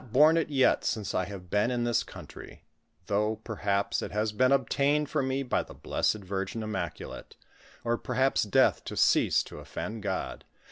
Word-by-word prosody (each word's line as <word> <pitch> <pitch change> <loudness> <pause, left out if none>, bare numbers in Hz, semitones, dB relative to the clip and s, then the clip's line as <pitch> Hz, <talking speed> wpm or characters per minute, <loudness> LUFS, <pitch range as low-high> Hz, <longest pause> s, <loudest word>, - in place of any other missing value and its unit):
borne 150 +6 +6
it 165 -2 +1
yet 135 -3 +3
since 105 -3 -2
I 95 - 0
have 90 -2 -9
been 105 +3 +2
in 120 -1 0
this 120 -1 +2
country, - - -11 0.4
though, 105 +3 +1
per 110 0 -8
haps, 100 +1 0
it - - -5
has 105 +1 0
been 130 +5 +3
obtained 140 +3 +2
for 155 - +1
me 135 +1 -1
by 125 - 0
the - - -11
Blessed 105 -2 -1
Virgin 95 +3 -3
Im 110 - -4
maculate), - - -5 0.5
or 120 0 0
perhaps 130 +2 +1
death 105 - +3
to - - -6
cease - - +4
to - - -10
offend 110 +1 -6
God. 95 -2 -3
110 Hz, 185 wpm, -29 LUFS, 100-130 Hz, 0.5 s, borne